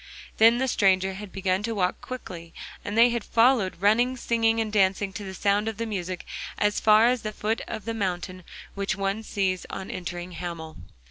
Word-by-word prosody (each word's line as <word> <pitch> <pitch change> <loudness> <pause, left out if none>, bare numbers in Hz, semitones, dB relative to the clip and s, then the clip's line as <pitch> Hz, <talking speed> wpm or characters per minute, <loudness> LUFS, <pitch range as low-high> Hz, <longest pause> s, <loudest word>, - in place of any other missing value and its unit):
Then 230 +2 +6
the 265 +1 0
stranger 190 -5 +2
had 200 0 -8
begun 190 0 0
to 225 +1 -3
walk 180 -3 0
quickly, 175 -10 -8 0.3
and 205 +2 -4
they 235 +1 +7
had 235 -2 -2
followed, 225 -7 +3
running, 235 +6 +3
singing 225 -1 +1
and 220 -1 -2
dancing 195 -1 +2
to 205 - -6
the 190 -1 -7
sound 205 +2 +1
of 220 -2 -3
the 230 - -2
music, 185 -4 -4 0.3
as 210 0 +1
far 215 +1 +6
as 245 0 +2
the 215 - -4
foot 215 +2 -2
of 205 - -6
the 230 - -2
mountain 185 -3 -3 0.3
which 200 0 -2
one 195 +2 -1
sees 190 -4 -2
on 190 - -6
entering 175 0 -5
Hamel. 170 -2 -6
205 Hz, 195 wpm, -26 LUFS, 185-225 Hz, 0.3 s, they